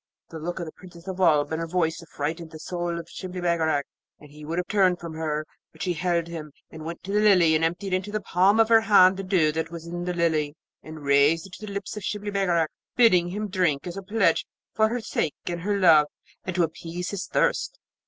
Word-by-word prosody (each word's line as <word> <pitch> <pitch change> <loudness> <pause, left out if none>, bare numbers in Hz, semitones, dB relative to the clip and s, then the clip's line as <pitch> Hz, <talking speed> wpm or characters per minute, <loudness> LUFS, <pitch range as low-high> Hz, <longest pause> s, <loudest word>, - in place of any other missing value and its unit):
The 165 - -7
look 175 +3 -4
of 170 - -3
the 155 - -8
Princess 175 0 -15
of 190 -1 -5
Oolb 155 -5 +3
and 160 +1 -2
her 165 - -3
voice 165 -1 0
affrighted 165 +1 -5
the 160 - -10
soul 175 +1 -3
of 165 -1 -7
Shibli 185 +1 -7
Bagarag, 160 -4 +1 0.4
and 150 -1 -15
he 150 +1 -13
would 160 +3 -4
have 180 - -1
turned 185 -4 +3
from 170 -2 -7
her; 155 -1 -2 0.3
but 160 - -8
she 180 - 0
held 170 0 0
him, 160 -3 -8 0.2
and 160 -1 -9
went 165 +1 -7
to 195 - -6
the 210 - +2
Lily, 185 -6 +5
and 155 +1 +2
emptied 180 +4 -1
into 185 +2 -1
the 215 - -1
palm 195 +2 +3
of 225 - +5
her 225 -1 +7
hand 195 -4 +6
the 195 - -5
dew 180 -5 +2
that 160 +1 -3
was 170 -1 -8
in 175 +1 -5
the 180 - -1
Lily, 155 -3 0 0.3
and 155 -1 -10
raised 140 +4 +3
it 190 - -14
to 215 - -8
the - - -6
lips 200 0 -5
of 210 - -6
Shibli 210 0 -3
Bagarag, 175 -5 +1 0.3
bidding 185 -8 +5
him 210 +4 -3
drink 180 -7 0
as 175 -1 -5
a 195 - -5
pledge 210 +4 +1 0.3
for 220 0 +3
her 240 +1 -2
sake 160 -7 -2
and 175 -1 -3
her 200 +2 0
love, 160 -5 +6 0.4
and 185 - -4
to 180 - +3
appease 170 +2 -4
his 200 -2 -4
thirst. - - 0
175 Hz, 240 wpm, -25 LUFS, 160-190 Hz, 0.4 s, her